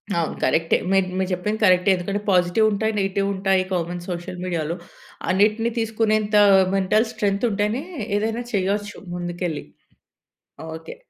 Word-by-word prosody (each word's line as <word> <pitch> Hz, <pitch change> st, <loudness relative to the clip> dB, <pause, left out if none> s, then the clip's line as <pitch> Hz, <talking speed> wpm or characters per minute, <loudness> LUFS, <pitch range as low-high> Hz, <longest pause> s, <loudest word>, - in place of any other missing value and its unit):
అవును. 170 Hz, -2 st, -1 dB
కరెక్టే. 165 Hz, 0 st, +2 dB
మీ 195 Hz, -, +4 dB, 0.2 s
మీరు 190 Hz, 0 st, -1 dB
చెప్పింది 210 Hz, +5 st, -2 dB
కరెక్టే. 185 Hz, 0 st, +4 dB
ఎందుకంటే 200 Hz, +3 st, -3 dB
పాజిటివుంటాయి, 205 Hz, +4 st, +2 dB
నెగెటివుంటాయి. 195 Hz, -1 st, +1 dB
కామన్ 175 Hz, 0 st, -2 dB
సోషల్ 175 Hz, +1 st, -5 dB
మీడియా‌లో. 170 Hz, -2 st, -2 dB, 0.5 s
అన్నిటిని 215 Hz, +4 st, +2 dB
తీసుకునేంత 215 Hz, -1 st, +1 dB, 0.4 s
మెంటల్ 210 Hz, +4 st, +2 dB
స్ట్రెంతుంటేనే 210 Hz, +2 st, 0 dB, 0.4 s
ఏదైనా 225 Hz, +3 st, -2 dB
చేయొచ్చు 205 Hz, +2 st, -1 dB, 0.2 s
ముందుకెళ్ళి. 175 Hz, -2 st, -4 dB, 1.1 s
ఓకే. 160 Hz, 0 st, -9 dB
195 Hz, 110 wpm, -22 LUFS, 180-215 Hz, 1.1 s, మీ